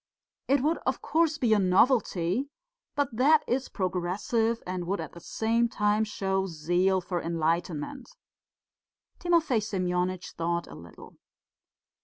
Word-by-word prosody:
It 275 -1 +3
would, 320 +3 +1
of - - 0
course, 320 -1 +2
be 240 -7 +2
a 210 - +4
novelty, 195 +2 +2 0.5
but 285 -5 -1
that 295 +6 +4
is 255 +2 -1
progressive 195 +5 -1
and 180 -1 -4
would 195 +2 -1
at - - -5
the 170 - -11
same 230 +6 0
time 210 0 +1
show 190 -2 -1
zeal 175 +3 +1
for 175 -1 -3
enlightenment." 165 - -2 1.1
Timofey 335 -8 +2
Semyonitch 185 -2 -2
thought 170 +1 -2
a - - -12
little. 85 -1 -13
195 Hz, 130 wpm, -28 LUFS, 175-245 Hz, 1.1 s, a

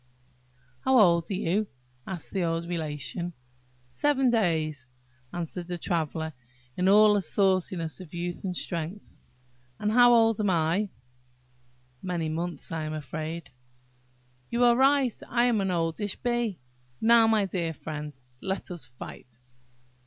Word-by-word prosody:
"How 265 - +3
old 170 -6 +5
are 195 - -1
you?" 195 +4 0 0.4
asked 185 -4 -5
the 195 - 0
old 165 0 -1
Relation. 170 +1 -3 0.6
"Seven 270 - +2
days," 160 - 0 0.4
answered 175 0 -5
the 175 -1 -3
Traveller, 160 -2 -2 0.4
in 185 +1 +2
all 210 +1 +7
the 205 - +2
sauciness 185 -4 0
of 180 -4 -11
youth 175 0 -4
and 180 -3 -3
strength. 170 +4 -4 0.7
"And 210 - -1
how 245 +1 +7
old 225 -1 +4
am 205 -2 +1
I?" 175 +4 +1 1.1
"Many 175 -4 -2
months, 170 +2 -4
I 160 -1 -2
am 155 - -4
afraid." 155 +1 -5 1.0
"You 235 +1 +1
are 240 -1 +6
right, 270 -1 +4 0.2
I 240 0 +3
am 235 -4 +2
an 190 - 0
oldish 175 +3 -1
bee. 240 -5 -1 0.4
Now, 230 0 +6
my 220 -2 +3
dear 175 -3 -2
friend, 150 -3 -7 0.2
let 190 0 -4
us 175 -2 -5
fight!" 125 -1 -11
180 Hz, 140 wpm, -27 LUFS, 165-215 Hz, 1.1 s, all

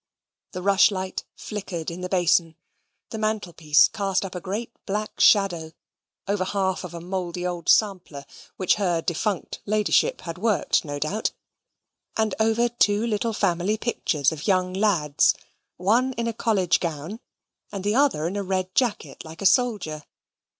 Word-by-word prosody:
The 180 - -5
rushlight 195 -1 +2
flickered 190 -6 -5
in 175 +2 -7
the 180 - -4
basin. 175 -3 +2 0.6
The 220 - -4
mantelpiece 175 -8 +2
cast 195 -2 -1
up 190 - -7
a 180 - -5
great 210 +6 -4 0.2
black 210 +2 -3
shadow, 175 -6 +4 0.5
over 200 -1 0
half 190 -1 -1
of 175 -1 -8
a - - -5
mouldy 180 0 -4
old 175 -1 -3
sampler, 185 -9 +2 0.3
which 185 - +2
her 175 -4 +1
defunct 180 +2 -2
ladyship 210 0 +2
had 165 0 -7
worked, 215 0 +1
no 145 -2 -5
doubt, 185 +10 -1 0.8
and 220 -2 +1
over 225 +2 +3
two 220 -2 +2
little 230 0 -1
family 195 +1 0
pictures 155 - 0
of 160 +3 -6
young 185 -2 +2
lads, 185 -8 +2 0.4
one 235 +8 +2
in 235 -1 -3
a 230 - -1
college 195 -7 +1
gown, 165 +5 -4 0.5
and 200 -2 -5
the 205 +1 +1
other 260 - +2
in 180 +4 -2
a 205 - -1
red 185 -1 -2
jacket 240 -5 -1
like 160 +4 -9
a - - -3
soldier. 195 - +2
190 Hz, 155 wpm, -24 LUFS, 170-210 Hz, 0.8 s, shadow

